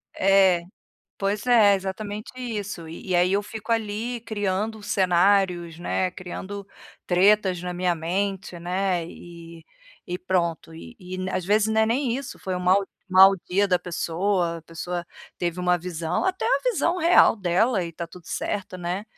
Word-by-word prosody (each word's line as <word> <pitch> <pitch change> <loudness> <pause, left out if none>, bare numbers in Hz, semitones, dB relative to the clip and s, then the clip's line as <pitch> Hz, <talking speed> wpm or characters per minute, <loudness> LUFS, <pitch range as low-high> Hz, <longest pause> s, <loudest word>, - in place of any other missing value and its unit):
É, 190 -2 +4 0.6
pois 200 +4 -2
é, 220 -5 +6
exatamente 205 +2 -5
isso. 210 -8 -5
E, 165 +4 -10
e 180 - +3
aí 180 +2 +3
eu 200 +1 +2
fico 220 +2 -5
ali 225 +2 -2
criando 210 0 -2
cenários, 180 -3 +2
né, 180 +1 -1
criando 190 +2 -7 0.4
tretas 190 0 +3
na 180 0 -4
minha 175 0 0
mente, 185 +2 -3
né, 180 -1 -1
e 170 -1 -12 0.4
e 180 +1 -4
pronto. 170 -3 -1
E 240 +9 -11
e, 185 -1 -7
n 185 0 -3
às 185 - -2
vezes, 210 +1 +3
não 220 0 +2
é 220 - +4
nem 245 +1 0
isso, 275 0 -7
foi 185 -1 -4
um 180 - -3
mau 190 +2 +3 0.2
mau 190 +1 +8
dia 200 +3 +2
da 180 -2 +2
pessoa, 175 0 -1
a - - -15
pessoa 170 +1 -5 0.3
teve 175 0 -2
uma 180 0 +2
visão 170 - -2
até 375 0 -1
uma - - +2
visão 365 -4 0
real 340 -6 +6
dela 190 +3 +1
e 170 - -5
tá 170 +1 -6
tudo 175 0 -15
certo, 190 -2 -3
né. 180 +3 -3
185 Hz, 170 wpm, -24 LUFS, 175-205 Hz, 0.6 s, mau